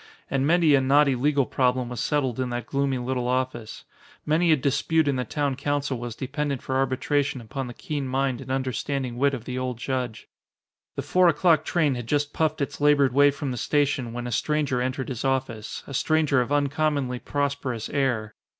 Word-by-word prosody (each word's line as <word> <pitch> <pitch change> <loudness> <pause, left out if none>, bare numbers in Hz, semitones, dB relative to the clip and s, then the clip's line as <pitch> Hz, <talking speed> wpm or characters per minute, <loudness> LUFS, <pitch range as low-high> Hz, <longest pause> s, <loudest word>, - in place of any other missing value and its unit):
And 135 0 +1
many 165 -2 +4
a 135 - +5
knotty 140 +1 +4
legal 140 +2 +2
problem 125 -1 +1
was 125 - -5
settled 135 -5 0
in 130 -1 -1
that 120 0 -3
gloomy 140 -1 0
little 125 0 -2
office. 125 -3 -2 0.4
Many 165 +2 +3
a - - +7
dispute 150 +3 +1
in 140 - +2
the 125 -1 -2
town 140 +2 -1
council 140 -2 -2
was 120 -1 -5
dependent 140 +1 -3
for 130 - -3
arbitration 135 +1 0
upon 130 +3 -5
the 120 - -8
keen 150 -7 -4
mind 130 -1 -1
and 130 - -10
understanding 130 0 -2
wit 140 +2 +2
of 120 -3 -9
the 125 0 -3
old 130 -2 -3
judge. 125 -3 -3 0.7
The - - -3
four 185 -1 +4
o'clock 165 -1 +4
train 155 -5 +2
had 120 -2 -5
just 145 +2 0
puffed 155 -1 0
its 140 - -3
labored 145 -3 +4
way 145 +1 +6
from 140 -1 -3
the 125 - -4
station 140 -3 0
when 120 +1 -5
a 120 - -4
stranger 145 0 0
entered 130 +1 -2
his 125 -3 -4
office, 130 -5 -2
a 140 - -9
stranger 150 -1 +2
of 125 - -3
uncommonly 145 -3 0
prosperous 140 -5 -2
air. 120 -7 -1
135 Hz, 195 wpm, -25 LUFS, 125-145 Hz, 0.7 s, a